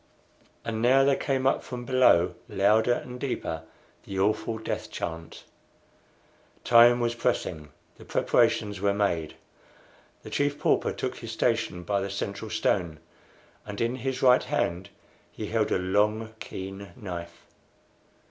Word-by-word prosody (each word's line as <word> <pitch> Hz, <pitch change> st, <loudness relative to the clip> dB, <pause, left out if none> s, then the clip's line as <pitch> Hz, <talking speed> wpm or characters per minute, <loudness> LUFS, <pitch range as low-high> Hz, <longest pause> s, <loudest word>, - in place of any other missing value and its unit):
And 110 Hz, -1 st, -2 dB
now 130 Hz, +3 st, +5 dB
there 140 Hz, 0 st, +4 dB
came 135 Hz, -2 st, -1 dB
up 135 Hz, -, +2 dB
from 125 Hz, -1 st, -7 dB
below, 105 Hz, -9 st, +4 dB, 0.2 s
louder 110 Hz, +5 st, +3 dB
and 125 Hz, 0 st, -6 dB
deeper, 105 Hz, -, -3 dB, 0.4 s
the 95 Hz, -, -6 dB
awful 105 Hz, +3 st, 0 dB
death 110 Hz, -, -4 dB
chant. 80 Hz, 0 st, -6 dB, 1.2 s
Time 120 Hz, +1 st, +7 dB
was 120 Hz, -1 st, 0 dB
pressing. 90 Hz, -10 st, -2 dB, 0.3 s
The -, -, -14 dB
preparations 105 Hz, -2 st, +1 dB
were 100 Hz, 0 st, +2 dB
made. 85 Hz, -7 st, -1 dB, 0.9 s
The -, -, -10 dB
Chief 145 Hz, 0 st, 0 dB
Pauper -, -, +1 dB
took -, -, -4 dB
his -, -, -7 dB
station 90 Hz, 0 st, 0 dB
by 100 Hz, +3 st, 0 dB
the 100 Hz, -, -3 dB
central 100 Hz, +2 st, -4 dB
stone, 95 Hz, -7 st, 0 dB, 0.7 s
and 105 Hz, -1 st, -7 dB
in 115 Hz, +2 st, 0 dB
his 130 Hz, +1 st, -3 dB
right 125 Hz, -1 st, +6 dB
hand 85 Hz, +2 st, -2 dB, 0.4 s
he -, -, -6 dB
held -, -, 0 dB
a -, -, +3 dB
long, 105 Hz, +4 st, 0 dB
keen 95 Hz, 0 st, -7 dB
knife. 85 Hz, -4 st, -8 dB
105 Hz, 140 wpm, -27 LUFS, 95-120 Hz, 1.2 s, Time